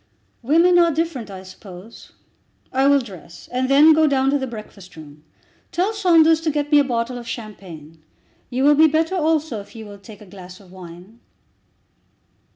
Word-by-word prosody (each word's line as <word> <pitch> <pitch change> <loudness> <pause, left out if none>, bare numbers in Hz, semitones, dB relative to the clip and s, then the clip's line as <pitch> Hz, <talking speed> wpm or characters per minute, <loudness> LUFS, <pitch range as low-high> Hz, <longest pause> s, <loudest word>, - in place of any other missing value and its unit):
"Women 335 +7 +3
are 340 -1 +4
different, 300 -8 -4
I 190 -1 -10
suppose. 185 +2 -14 0.6
I 265 +1 +2
will 280 0 +4
dress 185 -7 -13
and 255 +1 -2
then 295 +3 +6
go 315 0 +3
down 270 -1 +1
to 285 - 0
the 265 - -4
breakfast 210 -5 -12
room. 150 -1 -14 0.5
Tell 370 +5 -1
Saunders 330 -6 +3
to 325 - -1
get 295 0 -3
me 295 - +6
a - - +3
bottle 245 -1 -3
of 235 - -12
champagne. 175 -9 -10 0.5
You 255 +1 -2
will 295 +1 +5
be 315 +2 +5
better 320 +3 -1
also 315 - -1
if 200 - -18
you 220 -1 -9
will 205 -1 -12
take 205 +1 -15
a - - -13
glass 185 -1 -13
of 190 -3 -19
wine." 185 +4 -14
250 Hz, 180 wpm, -20 LUFS, 195-310 Hz, 0.6 s, then